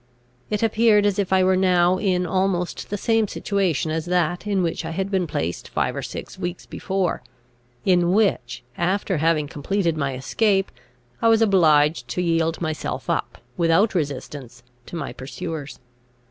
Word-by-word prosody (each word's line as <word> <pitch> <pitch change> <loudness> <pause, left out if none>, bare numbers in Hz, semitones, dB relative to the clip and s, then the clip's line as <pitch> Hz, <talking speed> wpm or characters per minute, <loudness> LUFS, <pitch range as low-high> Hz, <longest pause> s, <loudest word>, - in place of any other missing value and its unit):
It 210 +1 -1
appeared 220 -2 +4
as 205 -1 +1
if 195 -2 -1
I 190 -1 +4
were 185 0 +3
now 180 -1 +3
in 180 -3 +1
almost 185 0 -1
the 205 - -2
same 225 +1 +1
situation 190 -7 -1
as 160 0 -2
that 180 +2 0
in 195 -3 +1
which 170 0 -2
I 160 - -4
had 190 +4 -3
been 185 -3 +1
placed 85 - -3
five - - -1
or - - -3
six - - -7
weeks 175 0 -4
before, 190 -6 -2 0.6
in 175 -2 +3
which, 130 - +1 0.2
after 185 +1 0
having 155 -1 +1
completed 170 +4 -1
my 140 -3 -2
escape, 195 - +1 0.5
I - - +3
was 225 0 +5
obliged 155 - +3
to 120 +9 -2
yield 165 -1 +1
myself 155 -2 -3
up, - - -2 0.2
without 170 +5 +3
resistance, 140 -6 -4 0.2
to - - -8
my 165 - -4
pursuers. 150 +2 -6
180 Hz, 160 wpm, -23 LUFS, 160-195 Hz, 0.6 s, was